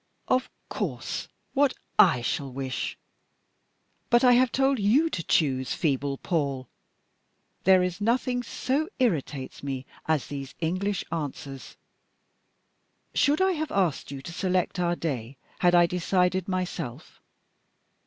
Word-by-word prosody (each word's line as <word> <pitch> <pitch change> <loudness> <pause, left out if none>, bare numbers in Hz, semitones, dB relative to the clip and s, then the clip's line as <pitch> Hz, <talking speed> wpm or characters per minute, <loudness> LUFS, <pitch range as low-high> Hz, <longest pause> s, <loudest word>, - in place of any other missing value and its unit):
"Of 255 0 +2 0.2
course, - - -3 0.3
what 280 -1 +3 0.2
I 145 -10 +6
shall 135 +2 -2
wish! 130 0 -3 1.1
But 240 0 +5
I 250 - +7
have 250 0 +4
told 270 -1 +2
you 260 +11 +3
to 170 - -2
choose, 130 -6 +1
feeble 140 -2 0
Paul! 140 -6 -1 1.0
There 185 0 +6
is 180 +2 -3
nothing 245 +3 +1
so 275 +5 -1
irritates 155 - -1
me 135 -2 -4 0.2
as 155 -4 +1
these 140 -2 -7
English 185 +4 -1
answers. 145 -4 -5 1.4
Should 295 +4 +3
I 380 - +3
have 315 -3 -2
asked 185 -7 0
you 135 -1 -7
to 170 - -7
select 185 0 0
our 175 -1 +1
day 135 -6 -4 0.2
had 175 -1 +4
I 175 0 +7
decided 180 +1 +1
myself? 175 -8 -4
175 Hz, 125 wpm, -27 LUFS, 140-225 Hz, 1.4 s, I